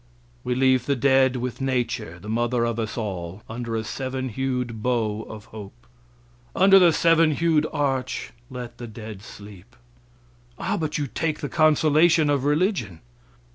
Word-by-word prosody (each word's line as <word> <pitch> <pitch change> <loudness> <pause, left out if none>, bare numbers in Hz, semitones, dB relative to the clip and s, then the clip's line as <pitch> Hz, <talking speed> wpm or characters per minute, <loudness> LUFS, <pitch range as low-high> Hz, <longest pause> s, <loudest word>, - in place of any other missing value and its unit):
We 125 - -1
leave 130 -1 +2
the 140 - +2
dead 130 0 +3
with 125 +1 -4
nature, 125 -10 -2
the 100 - -12
mother 120 +2 0
of 115 -1 -2
us 110 +1 -3
all, 95 -3 -5
under 115 0 -4
a 110 - -1
seven 130 +3 -4
hued 125 -2 -3
bow 110 -3 0
of 110 0 -9
hope. 110 +3 -11 0.7
Under 195 +1 +7
the 175 -2 +6
seven 165 0 +4
hued 155 0 +2
arch 135 -3 -2 0.2
let 125 -2 -8
the 120 - -6
dead 110 -2 -9
sleep. 100 +1 -13 0.8
"Ah, - - -2
but 155 -2 -2
you 145 - -1
take 155 +3 -3
the 145 - -3
consolation 155 0 +4
of 140 -2 0
religion." 145 - 0
125 Hz, 155 wpm, -24 LUFS, 110-145 Hz, 0.8 s, Under